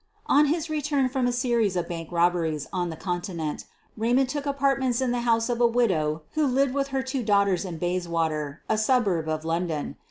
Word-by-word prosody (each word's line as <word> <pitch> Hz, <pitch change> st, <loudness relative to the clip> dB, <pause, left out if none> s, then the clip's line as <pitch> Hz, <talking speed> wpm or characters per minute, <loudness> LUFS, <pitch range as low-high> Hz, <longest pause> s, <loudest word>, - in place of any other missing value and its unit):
On 295 Hz, +1 st, +4 dB
his 320 Hz, +2 st, 0 dB
return 295 Hz, -3 st, 0 dB
from 255 Hz, -1 st, 0 dB
a -, -, +1 dB
series 240 Hz, -5 st, +1 dB
of 175 Hz, -, -1 dB
bank 165 Hz, -1 st, -6 dB
robberies 170 Hz, -3 st, +1 dB
on 175 Hz, -1 st, -1 dB
the 160 Hz, -, -5 dB
Continent, 175 Hz, -3 st, -4 dB, 0.3 s
Eaymond 245 Hz, +4 st, +2 dB
took 290 Hz, +1 st, -3 dB
apartments 270 Hz, -3 st, +1 dB
in 260 Hz, -2 st, 0 dB
the 245 Hz, -, 0 dB
honse 230 Hz, -1 st, +2 dB
of 240 Hz, -1 st, -1 dB
a 240 Hz, -, +6 dB
widow 165 Hz, -11 st, +1 dB
who 310 Hz, -2 st, +1 dB
lived 265 Hz, 0 st, +2 dB
with 275 Hz, 0 st, 0 dB
her 270 Hz, -1 st, -2 dB
two 265 Hz, 0 st, -2 dB
daughters 200 Hz, -4 st, +2 dB
in 175 Hz, -3 st, -5 dB
Bayswater, 165 Hz, -4 st, -2 dB
a 220 Hz, -, +1 dB
suburb 210 Hz, -9 st, +1 dB
of 155 Hz, 0 st, -2 dB
London. 165 Hz, -2 st, -2 dB
220 Hz, 195 wpm, -26 LUFS, 170-260 Hz, 0.3 s, a